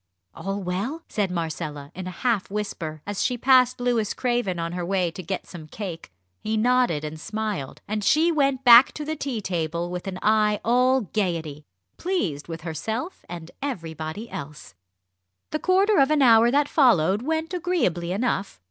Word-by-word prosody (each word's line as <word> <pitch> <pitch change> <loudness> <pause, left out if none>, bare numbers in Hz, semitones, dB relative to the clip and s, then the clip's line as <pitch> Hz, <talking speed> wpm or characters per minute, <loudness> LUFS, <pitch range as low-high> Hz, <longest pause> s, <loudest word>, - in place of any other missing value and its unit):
"All 195 +1 -4
well?" 205 - -3
said 205 -3 -1
Marcella, 160 -4 -4
in 185 0 -6
a 185 - -9
half 230 -6 +1
whisper, 170 -7 -4
as 205 -1 -2
she 250 - 0
passed 255 0 +4
Louis 240 -4 0
Craven 240 -7 -1
on 170 0 -3
her 175 0 -4
way 180 -1 0
to 185 - -7
get 190 +2 -4
some 160 -4 -10
cake. 170 - -7 0.3
He 220 0 -2
nodded 245 -9 +2
and 155 +1 -6
smiled, 210 -7 -4
and 210 0 -2
she 320 +9 +4
went 275 -4 +1
back 240 +1 +8
to 300 - -6
the 315 +1 -2
tea 270 -7 -3
table 170 -2 -2
with 180 +1 -5
an 185 -1 -4
eye 210 -1 +3
all 250 +3 +3
gaiety, 165 -7 -3 0.3
pleased 190 - -2
with 165 -1 -6
herself 220 - -4
and 170 -1 -8
everybody 165 - -5
else. 150 +2 -8 0.8
The 310 - -1
quarter 385 +2 +3
of 270 0 +4
an 305 -2 +3
hour 230 -1 +6
that 285 +3 +2
followed 210 - +3
went 320 +5 -2
agreeably 310 - 0
enough. 200 - -2
210 Hz, 170 wpm, -24 LUFS, 170-255 Hz, 0.8 s, back